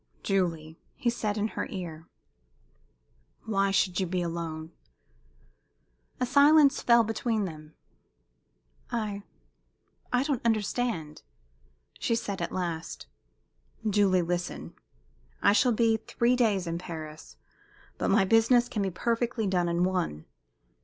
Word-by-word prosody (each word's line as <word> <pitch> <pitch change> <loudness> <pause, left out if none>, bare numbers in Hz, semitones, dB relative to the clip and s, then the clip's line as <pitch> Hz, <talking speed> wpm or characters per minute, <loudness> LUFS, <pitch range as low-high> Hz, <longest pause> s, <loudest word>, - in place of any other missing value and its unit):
"Julie," 165 -5 -1 0.2
he 245 -5 0
said 215 -3 -2
in 215 +1 0
her - - -4
ear, 170 -4 -7 1.4
"why 200 -3 +1
should 190 -1 +1
you 190 - 0
be 180 0 -1
alone?" 165 -1 -5 1.5
A 250 - +1
silence 285 +2 +5
fell 235 -1 +5
between 225 -1 -1
them. 155 -3 -9 1.1
"I 215 -4 -3 0.9
I 250 +1 +2
don't 280 -4 -1
understand," 215 -7 -1 0.8
she 230 - +1
said, 200 -5 -3
at 170 - -2
last. 170 -3 -4 0.8
"Julie, 195 -3 +3
listen! 175 +1 -3 0.7
I - - +4
shall 245 +3 +4
be 225 0 +3
three 235 +2 +1
days 210 -7 +2
in 170 0 -3
Paris, 155 -3 -8 0.6
but - - 0
my 195 - +4
business 230 +4 +4
can 220 -4 -3
be 195 - 0
perfectly 230 +4 -1
done 180 -3 +1
in 170 +1 +1
one. 180 - -1
195 Hz, 120 wpm, -28 LUFS, 170-230 Hz, 1.5 s, silence